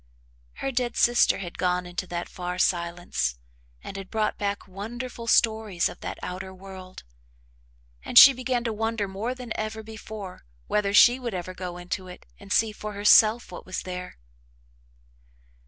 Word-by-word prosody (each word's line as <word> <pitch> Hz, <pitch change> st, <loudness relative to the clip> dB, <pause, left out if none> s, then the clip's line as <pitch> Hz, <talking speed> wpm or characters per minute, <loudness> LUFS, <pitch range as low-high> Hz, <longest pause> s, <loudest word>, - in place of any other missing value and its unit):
Her 270 Hz, -, -3 dB
dead 245 Hz, -1 st, -1 dB
sister 240 Hz, 0 st, +4 dB
had 175 Hz, -3 st, -8 dB
gone 180 Hz, 0 st, +1 dB
into 175 Hz, +1 st, -5 dB
that 175 Hz, 0 st, -4 dB
far 180 Hz, 0 st, -5 dB
silence 170 Hz, -, 0 dB, 0.5 s
and 195 Hz, -, -7 dB
had 195 Hz, -1 st, -8 dB
brought 215 Hz, -1 st, 0 dB
back 200 Hz, 0 st, -3 dB
wonderful 230 Hz, +5 st, -7 dB
stories 220 Hz, -6 st, +2 dB
of -, -, -11 dB
that -, -, -6 dB
outer 190 Hz, +1 st, -5 dB
world: 190 Hz, -1 st, -11 dB, 1.0 s
and -, -, -1 dB
she 275 Hz, -, +12 dB
began 250 Hz, -1 st, -1 dB
to 230 Hz, -2 st, -2 dB
wonder 225 Hz, -1 st, -1 dB
more 210 Hz, +6 st, -4 dB
than 250 Hz, -3 st, -9 dB
ever 215 Hz, 0 st, -4 dB
before 215 Hz, -3 st, -9 dB, 0.2 s
whether 205 Hz, -1 st, 0 dB
she 240 Hz, +5 st, +7 dB
would 235 Hz, -5 st, -4 dB
ever 185 Hz, +1 st, -5 dB
go 180 Hz, -1 st, -6 dB
into 185 Hz, +1 st, -5 dB
it 180 Hz, -, -12 dB
and 200 Hz, 0 st, -13 dB
see 220 Hz, 0 st, +3 dB
for 210 Hz, 0 st, -7 dB
herself 215 Hz, +2 st, +5 dB
what 175 Hz, -, -8 dB
was 185 Hz, -, -5 dB
there. 180 Hz, 0 st, -7 dB
200 Hz, 160 wpm, -26 LUFS, 180-225 Hz, 1.0 s, she